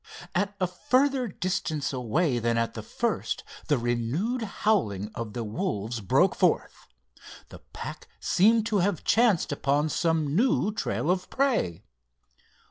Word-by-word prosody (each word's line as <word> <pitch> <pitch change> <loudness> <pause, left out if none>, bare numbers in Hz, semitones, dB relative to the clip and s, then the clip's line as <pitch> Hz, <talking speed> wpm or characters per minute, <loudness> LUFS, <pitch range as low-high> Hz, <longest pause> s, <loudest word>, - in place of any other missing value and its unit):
At 200 +2 0
a 185 - +2
further 255 +7 +1
distance 170 -7 -2
away 130 +2 0
than 115 0 0
at 115 0 0
the - - -6
first, - - -2 0.2
the 145 - +3
renewed 120 - -1
howling 160 - 0
of 115 -3 -5
the 120 - -3
wolves 115 - -3
broke 95 - +3
forth. - - 0 0.6
The - - -11
pack - - -7
seemed 220 +4 +3
to 215 -3 +1
have 185 -3 0
chanced 225 -10 +3
upon 145 +2 +1
some 155 -2 0
new 240 -1 +2
trail 175 -5 -1
of 185 0 -2
prey. 225 - 0
170 Hz, 135 wpm, -27 LUFS, -, 0.6 s, the